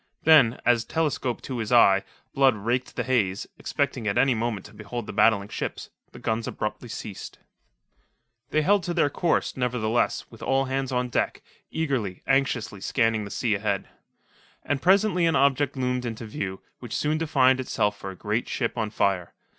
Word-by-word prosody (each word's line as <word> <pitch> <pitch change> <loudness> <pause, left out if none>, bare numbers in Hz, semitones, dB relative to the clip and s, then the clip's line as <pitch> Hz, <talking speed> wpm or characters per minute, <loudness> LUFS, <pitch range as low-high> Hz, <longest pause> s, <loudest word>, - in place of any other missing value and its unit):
Then, 150 -7 +6
as, 120 -2 +4
telescope 145 -3 -2
to 130 -3 -4
his 110 0 -3
eye, 100 -5 +6 0.3
Blood 135 -3 +4
raked 120 +5 -2
the - - -1
haze, 105 -7 0
expecting 110 - -2
at 100 - 0
any 135 -1 +4
moment 110 -4 -2
to 100 - -13
behold 105 +2 -6
the - - -7
battling 100 -3 +3
ships, - - -5 0.2
the - - -12
guns 110 0 -2
abruptly 105 +3 -4
ceased. 105 -3 -7 1.1
They 155 +1 +1
held 200 +4 +4
to 175 - -2
their 145 -4 +2
course, 170 +2 0
nevertheless, 120 -2 0
with 115 - -14
all 135 0 +1
hands 135 0 -2
on 125 0 0
deck, - - -1 0.3
eagerly, 130 - -2
anxiously 125 -7 0
scanning 115 -3 +1
the - - -8
sea 110 +2 0
ahead. 100 -1 -1 0.7
And 145 -2 -1
presently 190 -2 +4
an 165 - +2
object 140 0 +2
loomed 125 -1 -1
into 115 -1 -5
view, 95 -3 -5 0.2
which 120 -3 -6
soon 155 +1 0
defined 130 -5 +3
itself 105 -5 0
for 95 - -7
a 95 - -8
great 105 +5 -2
ship 120 -1 -2
on 110 -1 -1
fire. 95 -4 -1
120 Hz, 175 wpm, -25 LUFS, 105-135 Hz, 1.1 s, Then